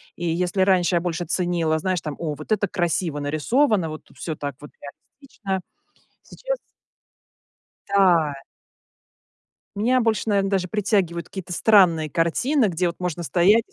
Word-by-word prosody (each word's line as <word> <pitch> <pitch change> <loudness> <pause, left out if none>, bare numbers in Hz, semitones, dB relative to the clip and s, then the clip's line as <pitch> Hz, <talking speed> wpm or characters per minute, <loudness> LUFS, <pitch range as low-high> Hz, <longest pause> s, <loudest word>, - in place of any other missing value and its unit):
И 175 - -5
если 175 +3 0
раньше 185 -2 +3
я 170 - +2
больше 175 -1 -3
ценила, 170 -2 0
знаешь 185 0 -1
там: 150 -2 -5
"О, 155 -3 -3
вот 155 +8 -11
это 205 -2 +2
красиво 170 -4 -1
нарисовано, 165 - +1
вот 155 - -9
всё 160 - -5
так 145 -2 -5
вот 145 - -12 0.5
реалистично". 200 -9 -5 0.6
Сейчас - - -5 1.3
Да. 175 -6 +4 1.4
Меня 250 +5 +2
больше, 225 -4 +1
наверно, 195 -1 +1
даже 190 -2 0
притягивают 190 -4 0
какие-то 190 -2 -7
странные 175 -6 +4
картины, 220 - +1
где 180 -1 0
вот 170 - -5
можно 175 -1 -3
стоять 190 +7 +4
и - - -31
180 Hz, 145 wpm, -23 LUFS, 165-200 Hz, 1.4 s, Да